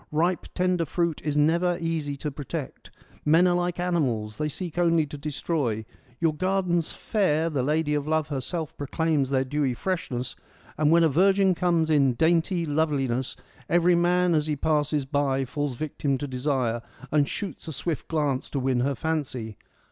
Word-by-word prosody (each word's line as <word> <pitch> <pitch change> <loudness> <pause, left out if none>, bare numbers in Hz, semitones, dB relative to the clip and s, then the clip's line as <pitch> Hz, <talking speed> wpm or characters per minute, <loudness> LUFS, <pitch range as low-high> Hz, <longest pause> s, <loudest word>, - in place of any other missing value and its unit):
Ripe 170 +4 +1
tender 180 -2 +1
fruit 170 +1 -1
is 150 -1 -1
never 170 +4 +3
easy 160 -4 -2
to 150 +2 -4
protect; 145 +1 -6 0.3
men 165 +4 +5
are 180 - +4
like 175 0 -1
animals, 125 -12 -1
they 150 - 0
seek 175 +2 -5
only 170 -2 +3
to 150 - -8
destroy. 145 -6 -2 0.3
Your 165 -2 +2
gardens 180 -1 0
fair, 165 -6 0
the 140 -4 0
lady 150 +3 +1
of 145 0 -1
love 155 -1 +1
herself 150 +3 -3
proclaims 145 -1 0
their 135 -1 +2
dewy 135 -1 -1
freshness, 130 -7 -3 0.4
and 150 -1 +2
when 170 +1 +5
a - - +6
virgin 190 +5 +4
comes 170 -3 +1
in 135 -5 +4
dainty 170 +3 +2
.loveliness 140 -5 0 0.3
every 175 +1 +4
man 175 +1 +3
as 155 -1 +1
he 150 - 0
passes 150 -1 0
by 135 -1 0
falls 145 -1 -3
victim 145 -2 -1
to 145 - -4
desire, 125 -3 -1 0.3
and 145 -2 +3
shoots 195 -4 -5
a - - -3
swift 150 +2 -3
glance 145 -5 -1
to 140 - -2
win 130 -1 +1
her 135 +3 +1
fancy. 130 -7 -3
155 Hz, 170 wpm, -26 LUFS, 140-170 Hz, 0.4 s, a